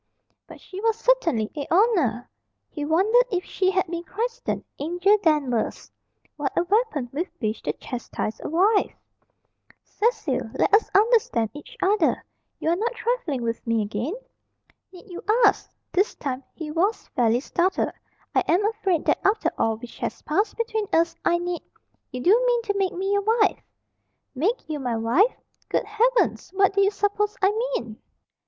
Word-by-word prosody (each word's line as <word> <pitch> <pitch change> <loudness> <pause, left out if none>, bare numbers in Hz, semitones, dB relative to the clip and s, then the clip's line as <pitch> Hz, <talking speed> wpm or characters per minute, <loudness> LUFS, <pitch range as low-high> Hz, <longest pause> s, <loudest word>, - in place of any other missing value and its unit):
But - - -12
she 380 +1 -9
was 450 0 +1
certainly 340 - +1
a 290 -2 -4
"oner." 330 - +2 0.4
He 295 - -5
wondered 405 +11 +4
if 365 -3 -2
she 375 -1 0
had 375 -1 +1
been 340 -1 -5
christened 465 +6 -3 0.2
"Angel" 355 +7 +3
Danvers. 290 - 0 0.5
What 290 -2 -2
a - - +4
weapon 400 - 0
with 330 +7 -2
which 215 -2 -2
to - - -2
chastise 240 -3 -5
a - - -4
wife! 395 +7 +2 0.9
"Cecil, 465 +3 -1
let 405 - +1
us 415 - +5
understand 405 - +3
each 485 +12 -12
other. 385 -3 +2 0.3
You - - -1
are - - +3
not 460 +6 -2
trifling 465 - -2
with 230 0 -2
me 230 -1 +2
again?" 220 - -3 0.8
"Need 365 +2 -14
you 355 -3 -8 0.2
ask?" 405 - +2 0.2
This 390 +4 +1
time 270 -2 -4
he 315 -2 -6
was 380 +8 0
fairly 235 -1 +2
startled. 350 +7 0 0.4
"I - - +4
am 370 +5 +3
afraid 385 -7 -1
that - - +2
after 415 +3 +2
all 225 -1 +1
which 235 +1 -11
has - - -4
passed 400 +8 0
between 445 -2 -1
us, 330 0 +3
I 345 - +3
need 350 -1 -3 0.3
" - - -46
"You 250 - -5
do 430 - +4
mean 480 -1 +2
to 420 -3 -1
make 385 -2 0
me 385 +2 -2
your 405 - +2
wife?" 435 0 +2 0.7
"Make 365 - -1
you 305 -2 -3
my 245 -3 -2
wife? 260 - +3 0.3
Good - - 0
heavens! 460 +4 +1
What 390 0 +4
do 400 - +3
you 395 - +5
suppose 410 +1 -1
I 390 0 +4
mean?" 435 - -3
370 Hz, 170 wpm, -24 LUFS, 290-430 Hz, 0.9 s, us